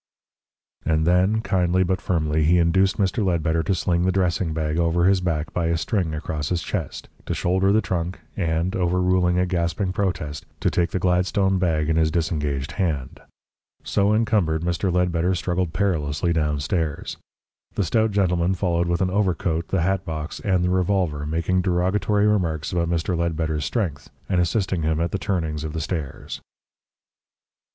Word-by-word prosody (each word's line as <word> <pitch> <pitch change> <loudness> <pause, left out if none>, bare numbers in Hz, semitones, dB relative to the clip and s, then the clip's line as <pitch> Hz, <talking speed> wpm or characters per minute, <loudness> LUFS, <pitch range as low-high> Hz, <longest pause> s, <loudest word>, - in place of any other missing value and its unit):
And 80 0 +1
then 95 +5 +3
kindly, 95 -2 +1
but 95 +1 -1
firmly, 80 -3 0
he 85 +4 +4
induced 95 +3 +3
Mr. 95 +1 +1
Ledbetter 85 -3 +1
to 95 +3 0
sling 85 0 0
the 95 +1 +2
dressing 90 -2 0
bag 80 0 -1
over 85 +1 +2
his 95 0 +3
back 80 -3 -2
by 85 -2 0
a 85 0 +1
string 85 -3 -1
across 75 -2 -3
his 90 -2 -1
chest, - - -4 0.2
to - - -1
shoulder 95 +2 +2
the 110 +2 +4
trunk, 90 0 -2 0.2
and, 85 0 -1
overruling 90 0 +2
a 90 - +2
gasping 90 +2 -1
protest, 90 -5 -3
to 90 - +2
take 85 0 +1
the - - -2
Gladstone 95 +2 +1
bag 80 -4 +1
in 80 0 +1
his 80 -1 +3
disengaged 75 -3 -1
hand. 80 -8 -2 0.6
So 100 +1 +1
encumbered, 105 -8 +1
Mr. 85 +2 0
Ledbetter 90 0 +1
struggled 90 -1 -1
perilously 85 -3 0
downstairs. 75 +1 -1 0.6
The 100 - +1
stout 110 +6 +2
gentleman 90 -3 +1
followed 85 -2 0
with 85 +1 +1
an 90 - 0
overcoat, 90 -4 0
the 85 -4 0
hatbox, 85 -4 -2
and 95 -3 +1
the 90 - +1
revolver, 90 -5 0
making 85 +4 0
derogatory 95 +3 +1
remarks 85 -8 0
about 85 -2 0
Mr. 85 +1 0
Ledbetter's 80 -3 -1
strength, 80 - -2 0.2
and 90 -2 +2
assisting 95 -1 0
him 80 0 0
at 85 +1 0
the 100 - -2
turnings 80 -7 -2
of 80 -1 -4
the 80 - -3
stairs. 75 -4 -5
85 Hz, 165 wpm, -23 LUFS, 80-95 Hz, 0.6 s, he